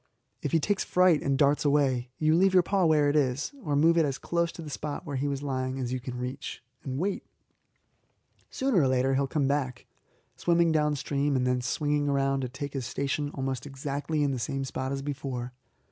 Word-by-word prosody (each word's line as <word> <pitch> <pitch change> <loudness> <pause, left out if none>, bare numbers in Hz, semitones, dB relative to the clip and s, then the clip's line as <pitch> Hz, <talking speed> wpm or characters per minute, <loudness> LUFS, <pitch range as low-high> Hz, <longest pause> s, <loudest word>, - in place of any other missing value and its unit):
If 145 - -2
he 165 - +4
takes 200 +5 0
fright 180 -4 +4
and 140 -1 +1
darts 145 +1 +3
away, 135 -4 +2
you 155 0 +3
leave 190 +2 +4
your 180 - +6
paw 195 0 +1
where 155 -2 +4
it 145 - +1
is, 140 - +1
or 150 -5 0
move 165 +3 +4
it - - +5
as 140 -3 -1
close 170 -1 -1
to 165 - -8
the 155 - -7
spot 145 +4 -5
where 145 -3 -4
he 135 +2 -1
was 140 0 -3
lying 130 -1 -2
as 125 -2 -3
you 130 - -1
can 125 0 -6
reach, 125 +2 -5 0.2
and 130 -1 -4
wait. 195 +6 -1 1.3
Sooner 260 -9 +1
or 135 - +3
later 130 +1 +2
he 135 - +2
will 140 - +1
come 140 0 0
back, 135 -3 -1 0.5
swimming 170 -1 +3
downstream 145 -2 +1
and 125 -1 +1
then 125 0 +1
swinging 145 +3 0
round 135 -1 +1
to 125 - -3
take 140 +2 -6
his 130 -4 -3
station 140 +2 -2
almost 135 0 -3
exactly 145 +2 -2
in 140 - +1
the 130 - -2
same 135 +2 -2
spot 130 0 -3
as 135 0 -3
before. 130 -3 -4
140 Hz, 215 wpm, -28 LUFS, 130-150 Hz, 1.3 s, your